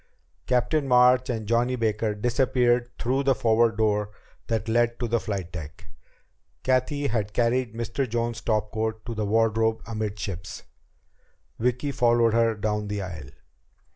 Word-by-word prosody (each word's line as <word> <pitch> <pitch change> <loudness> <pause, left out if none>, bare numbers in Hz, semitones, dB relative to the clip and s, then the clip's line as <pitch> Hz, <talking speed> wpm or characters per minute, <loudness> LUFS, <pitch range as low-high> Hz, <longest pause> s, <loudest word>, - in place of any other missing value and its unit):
Captain 135 +4 +1
March 125 +1 +5
and 110 -4 -3
Johnny 120 +3 +1
Baker 110 -2 -1
disappeared 120 +1 +1
through 130 +3 0
the 135 -1 +2
forward 115 -1 +2
door 105 -1 +1 0.4
that 115 -1 -1
led 120 +1 +1
to 120 - -1
the 115 +1 +1
flight 100 -6 -4
deck. 80 +1 -9 0.7
Cathy 130 +3 +1
had 110 -4 -1
carried 120 -1 +1
Mr. 115 +3 -2
Jones's 120 0 -2
topcoat 110 0 -2
to 120 - -4
the 110 -2 -2
wardrobe 110 +1 +1
amidships. 100 -5 -5 1.0
Vicki 125 +4 0
followed 120 -3 +3
her 115 -1 +3
down 105 0 -2
the 100 -1 -3
aisle. 80 -8 -8
115 Hz, 140 wpm, -25 LUFS, 105-120 Hz, 1.0 s, March